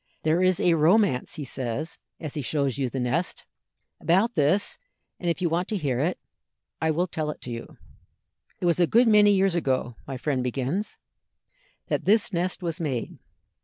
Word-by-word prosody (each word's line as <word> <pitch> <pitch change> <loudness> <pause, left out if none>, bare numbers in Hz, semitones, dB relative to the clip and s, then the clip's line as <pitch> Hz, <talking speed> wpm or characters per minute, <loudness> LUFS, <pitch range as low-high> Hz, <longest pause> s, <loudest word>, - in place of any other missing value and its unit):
"There 160 +3 +2
is 185 -1 +3
a 175 - +4
romance," 165 - +3
he 150 - -5
says, 130 +5 -4 0.2
as 155 -4 -6
he 150 - -3
shows 140 -1 -1
you 130 -2 0
the 135 - -4
nest, 125 +9 -2 0.5
"about 190 +9 +2
this, 155 +5 +1 0.4
and 175 - -1
if 170 +2 -1
you - - +3
want 170 +3 0
to 215 - -2
hear 135 -8 -1
it, 170 +6 0 0.6
I 160 - +2
will 165 +3 +1
tell 155 -3 -3
it 150 - -5
to 125 - -7
you." 115 0 -8 0.8
"It - - -3
was 170 0 +2
a 175 - +4
good 235 +6 +4
many 210 -1 +6
years 195 -2 +3
ago," 130 -7 0
my 135 -1 -4
friend 135 0 -1
begins, 135 - -2 0.9
"that - - -2
this 210 0 +3
nest 180 +2 -1
was 170 +1 -3
made. 135 -8 -3
160 Hz, 185 wpm, -26 LUFS, 135-185 Hz, 0.9 s, many